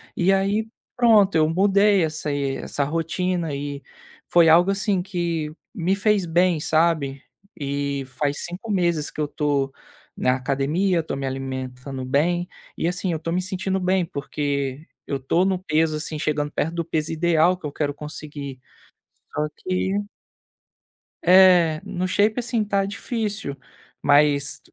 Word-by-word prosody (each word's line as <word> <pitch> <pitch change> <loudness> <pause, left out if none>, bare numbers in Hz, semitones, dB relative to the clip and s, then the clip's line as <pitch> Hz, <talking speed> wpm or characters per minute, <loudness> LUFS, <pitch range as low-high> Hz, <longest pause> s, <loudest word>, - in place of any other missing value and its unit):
E 190 +2 +3
aí, 200 +3 +1 0.3
pronto, 215 -6 +5
eu 155 0 +4
mudei 200 +1 +4
essa 155 -1 -2
essa 140 0 -2
rotina 165 +1 -1
e 140 0 -5 0.5
foi 170 -2 +5
algo, 175 +4 +6
assim, 195 -1 0
que 170 -5 -3 0.2
me 185 -1 0
fez 205 -1 +2
bem 175 0 +2
sabe? 155 -4 +1 0.3
E 140 -1 -2 0.2
faz 145 -1 0
5 180 +6 -6
meses 170 -6 +1
que - - -5
eu - - +1
estou 145 -2 -1 0.5
na 125 - +2
academia, 140 +8 0
estou 160 - -3
me 135 - -4
alimentando 130 0 -5
bem 165 +7 +1 0.3
e, 165 - 0
assim, 180 0 -2
eu 160 - -1
estou 165 +1 -4
me 180 - +1
sentindo 190 +1 -2
bem, 185 0 +1
porque 140 -1 -3 0.2
eu 140 - -2
estou 150 +7 +1
no 190 -1 +1
peso, 155 -2 +1
assim, 155 0 -4
chegando 150 -2 -1
perto 165 +3 -2
do 170 - -1
peso 155 -1 -2
ideal 170 +1 +3
que 170 - -11
eu 145 - -3
quero 145 0 -2
conseguir. 145 -2 -7 0.8
Só 150 +1 0
que 190 +2 -1 1.2
É, 180 -3 +6
no 185 -2 -2
shape 210 +5 +2
assim, 235 -2 0
tá 200 -1 +1
difícil 210 - -3 0.5
mas 145 -2 +3
165 Hz, 150 wpm, -23 LUFS, 145-185 Hz, 1.2 s, algo